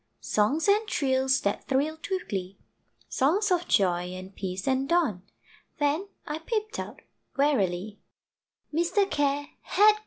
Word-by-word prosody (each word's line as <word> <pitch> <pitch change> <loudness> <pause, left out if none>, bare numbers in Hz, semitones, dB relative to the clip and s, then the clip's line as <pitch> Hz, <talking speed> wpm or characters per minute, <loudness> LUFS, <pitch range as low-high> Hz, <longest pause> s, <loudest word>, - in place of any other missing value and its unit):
Songs 265 - +1
and 420 +2 +4
trills 265 -5 +2
that 200 - -2
thrilled 300 +4 0
with 375 -1 -2
glee, 190 -1 -4 0.5
Songs 370 +10 +2
of 355 -1 +2
joy, 180 -3 +2
and 185 +1 -9
peace, 190 +2 -4
and 265 +1 +1
dawn 310 - +2 0.6
Then 300 +6 +1 0.2
I 300 +1 -4
peeped 435 +5 -3
out - - -7 0.3
warily 210 -8 +1 0.7
Mr. 355 +5 +2
Care 290 -2 0
had 425 +1 +5
gone! 425 - -6
285 Hz, 135 wpm, -27 LUFS, -, 0.7 s, had